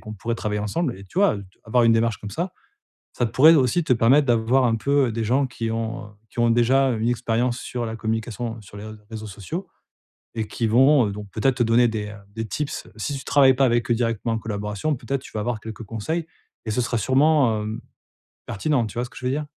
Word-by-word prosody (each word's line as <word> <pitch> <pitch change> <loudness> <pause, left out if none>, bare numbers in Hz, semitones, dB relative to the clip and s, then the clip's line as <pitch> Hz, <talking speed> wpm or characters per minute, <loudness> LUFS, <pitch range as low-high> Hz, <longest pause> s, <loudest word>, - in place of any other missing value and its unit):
qu'on 110 0 -8
pourrait 115 +4 -3
travailler 105 -2 -2
ensemble?» 125 - -1
et 100 - -11
tu 165 - -6
vois, 200 - +4 0.3
avoir 120 +2 +2
une 115 - +5
démarche 115 -1 +2
comme 105 - -8
ça, 175 - -3 0.6
ça 120 - 0
pourrait 155 +8 +6
aussi 140 +5 +2
te 130 - -2
permettre 130 +5 +4
d'avoir 120 +3 +3
un 115 - +2
peu 135 +1 +1
des 115 0 -2
gens 130 +4 +2
qui 115 -2 -4
ont, 115 -1 -3
heu, - - -14 0.2
qui - - -21
ont 120 0 +4
déjà 130 +3 +3
une 115 +1 0
expérience 120 +1 0
sur 120 -1 -4
la 110 - -4
communication 110 0 -3
sur 100 +1 -13
les 105 - -8
rés 110 0 -8 0.2
réseaux 110 -1 -6
sociaux 130 - -6 0.7
et 110 -1 -2
qui 115 - -2
vont 130 +1 +5
donc 105 0 -8
peut-être 125 +3 +1
te 120 - +3
donner 120 +1 +4
des, 105 -2 -3
heu, 105 - -9
des 115 +1 -5
tips. 145 +9 -4
Si 140 +7 -3
tu 130 - -10
travailles 135 -2 +5
pas 135 +1 +3
avec 120 0 +1
eux - - +4
directement 115 -1 -1
en - - -2
collaboration, 105 +7 -2
peut-être 135 +2 -3
tu - - -12
vas 105 - -2
avoir 120 -1 -2
quelques 110 0 -8
conseils. 155 +11 -3 0.4
Et 110 - -2
ce 125 - -1
sera 115 0 -1
sûrement, 130 -1 +3
hem, 110 +2 -5 0.7
pertinent. 125 +2 0
Tu 105 - -11
vois 120 - 0
ce - - -11
que - - -14
je 125 - -7
veux 125 - +1
dire? 150 +2 -2
115 Hz, 235 wpm, -23 LUFS, 110-130 Hz, 0.7 s, pourrait